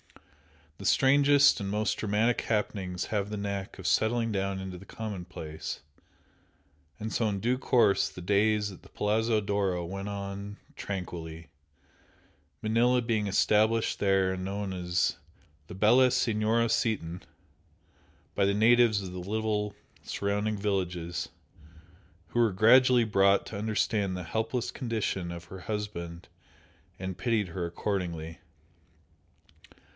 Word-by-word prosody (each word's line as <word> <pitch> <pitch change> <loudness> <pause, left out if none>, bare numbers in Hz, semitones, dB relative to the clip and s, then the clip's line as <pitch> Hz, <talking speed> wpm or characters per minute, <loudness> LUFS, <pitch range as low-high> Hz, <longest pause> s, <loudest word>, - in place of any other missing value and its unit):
The 100 - -8
strangest 140 +2 +5
and 100 -2 -3
most 105 +1 0
dramatic 110 +3 +1
happenings 100 -4 -2
have 100 -2 -2
the 105 - -4
knack 100 -1 -4
of 95 - -10
settling 115 +2 +2
down 95 -1 -1
into 95 -1 -6
the 100 - -13
commonplace, 90 -7 -6 1.2
and 110 +1 -4
so 115 -2 +1
in 100 -1 -2
due 125 +5 0
course 110 -7 +3
the - - -11
days 105 +3 +2
at 95 - -13
the - - -17
Palazzo 110 +1 +1
d'Oro 100 -4 -1
went 95 +3 -5
on 100 0 -6 0.2
tranquilly, 85 -4 -6 1.1
Manella 120 +3 +3
being 110 -3 0
established 110 +3 +2
there 95 -1 +2
and 95 0 -5
known 100 0 -3
as 90 -1 0 0.5
"la - - -7
bella 120 +6 +5
Signora 115 -2 +1
Seaton" 95 -7 -1 1.1
by 100 - +2
the 100 0 +2
natives 110 -1 +4
of 95 - -6
the 90 - -6
little 105 +1 -2 0.3
surrounding 105 +1 -2
villages, 90 -4 -2 1.0
who 120 - -1
were 115 -3 +4
gradually 125 +5 +6
brought 100 -2 +3
to - - -8
understand 105 -2 0
the 90 - -5
helpless 110 +6 -2
condition 110 -8 -2
of 85 -1 -7
her 95 +2 -10
husband 90 -4 -5 0.7
and 95 -1 -5
pitied 110 -6 0
her 85 0 -3
accordingly. 85 -3 -3
100 Hz, 130 wpm, -29 LUFS, 95-110 Hz, 1.2 s, gradually